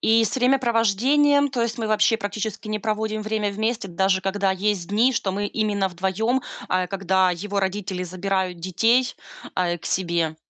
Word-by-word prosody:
И 225 Hz, 0 st, +4 dB
с 210 Hz, -, -2 dB
времяпровождением, 260 Hz, +3 st, +3 dB
то 250 Hz, -3 st, -1 dB
есть 235 Hz, +1 st, -2 dB
мы 225 Hz, -, -2 dB
вообще 215 Hz, +1 st, +3 dB
практически 215 Hz, +1 st, -4 dB
не 215 Hz, -1 st, -3 dB
проводим 215 Hz, 0 st, -2 dB
время 215 Hz, -1 st, -1 dB
вместе, 220 Hz, +1 st, -2 dB
даже 190 Hz, +1 st, +1 dB
когда 195 Hz, 0 st, 0 dB
есть 190 Hz, -1 st, -1 dB
дни, 230 Hz, +6 st, +3 dB
что 195 Hz, -4 st, -1 dB
мы 205 Hz, +2 st, -2 dB
именно 205 Hz, -3 st, 0 dB
вдвоем, 190 Hz, +8 st, -1 dB, 0.3 s
э, 185 Hz, -1 st, 0 dB
когда 190 Hz, -1 st, +2 dB
его 200 Hz, +3 st, -2 dB
родители 190 Hz, -1 st, -2 dB
забирают 185 Hz, 0 st, -2 dB
детей, 225 Hz, +9 st, +2 dB, 0.4 s
э, 175 Hz, -1 st, 0 dB
к -, -, -9 dB
себе. 170 Hz, -3 st, 0 dB
205 Hz, 165 wpm, -23 LUFS, 190-225 Hz, 0.4 s, И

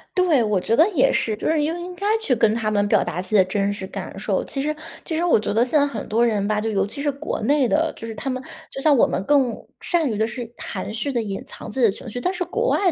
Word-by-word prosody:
对， 340 Hz, -10 st, +4 dB
我 210 Hz, -3 st, +1 dB
觉 225 Hz, +5 st, +1 dB
得 320 Hz, -, +6 dB
也 295 Hz, -9 st, +3 dB
是， 220 Hz, -, 0 dB
就 -, -, -3 dB
是 315 Hz, -1 st, +2 dB
应 320 Hz, +4 st, -1 dB
应 355 Hz, +1 st, -7 dB
该 400 Hz, -, -5 dB, 0.2 s
去 265 Hz, -, +1 dB
跟 225 Hz, -2 st, +3 dB
他 220 Hz, -1 st, -1 dB
们 205 Hz, -1 st, +1 dB
表 -, -, +3 dB
达 180 Hz, -, -3 dB
自 185 Hz, -, -8 dB
己 215 Hz, -, 0 dB
的 190 Hz, -3 st, +6 dB
真 200 Hz, +2 st, 0 dB
实 205 Hz, -2 st, -5 dB
感 -, -, -7 dB
受。 -, -, -1 dB
其 275 Hz, -, -4 dB
实 305 Hz, +2 st, -1 dB, 0.3 s
其 320 Hz, -, -3 dB
实 330 Hz, -, 0 dB
我 345 Hz, -10 st, +4 dB
觉 210 Hz, -, -2 dB
得 225 Hz, +3 st, +4 dB
现 275 Hz, +5 st, +2 dB
在 285 Hz, -, +4 dB
很 230 Hz, -7 st, -5 dB
多 230 Hz, +3 st, +3 dB
人 210 Hz, -4 st, +1 dB
吧， 210 Hz, 0 st, +1 dB
就 220 Hz, +1 st, -1 dB
尤 195 Hz, -3 st, +1 dB
其 225 Hz, +8 st, -7 dB
是 290 Hz, 0 st, +1 dB
国 280 Hz, +3 st, -4 dB
内 275 Hz, +3 st, +3 dB
的， 315 Hz, +5 st, +1 dB
就 -, -, -8 dB
是 225 Hz, -, -5 dB
他 270 Hz, -, -4 dB
们 255 Hz, -1 st, -2 dB, 0.3 s
就 270 Hz, -, -6 dB
像 295 Hz, 0 st, +5 dB
我 -, -, +5 dB
们 190 Hz, -, -2 dB
更 265 Hz, 0 st, +3 dB, 0.2 s
善 335 Hz, -5 st, 0 dB
于 215 Hz, -, -2 dB
的 220 Hz, +1 st, +1 dB
是 235 Hz, 0 st, -6 dB
含 200 Hz, +1 st, -5 dB
蓄 270 Hz, +5 st, -2 dB
地 240 Hz, -, +1 dB
隐 200 Hz, -3 st, -4 dB
藏 -, -, -9 dB
自 265 Hz, -, -5 dB
己 245 Hz, -, +5 dB
的 215 Hz, -, +4 dB
情 235 Hz, -, -9 dB
绪。 245 Hz, -, -5 dB
但 360 Hz, +9 st, -1 dB
是 360 Hz, -, -2 dB
国 465 Hz, +7 st, -1 dB
外 380 Hz, -3 st, +3 dB
240 Hz, 330 characters per minute, -22 LUFS, 215-300 Hz, 0.3 s, 得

